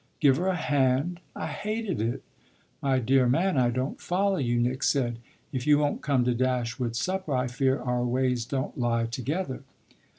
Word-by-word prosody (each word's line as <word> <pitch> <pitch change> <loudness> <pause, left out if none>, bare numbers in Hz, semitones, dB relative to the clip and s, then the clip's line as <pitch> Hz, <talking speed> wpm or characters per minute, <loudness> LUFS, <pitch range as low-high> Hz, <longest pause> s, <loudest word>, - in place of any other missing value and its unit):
"Give 135 -4 +5
her 180 - -1
a 190 - +2
hand? 145 +2 +1 0.2
I - - -4
hated 215 - -3
it." 115 +2 -2 0.6
"My 135 -1 +2
dear 130 0 +3
man, 175 +8 +2
I 125 -2 +3
don't 130 +3 -3
follow 195 +2 +1
you," 120 -4 +1
Nick 125 +2 0
said. 120 -5 +1 0.3
"If 130 +1 -3
you 150 -1 +6
won't 145 -1 0
come 135 -2 +2
to 125 - +2
Dashwood's 120 -1 -1
supper 185 -2 -1
I 125 0 +1
fear 130 +2 +1
our 125 0 -1
ways 125 -1 0
don't 135 +2 -3
lie 115 -1 +1
together." 130 +6 -3
130 Hz, 175 wpm, -27 LUFS, 125-150 Hz, 0.6 s, you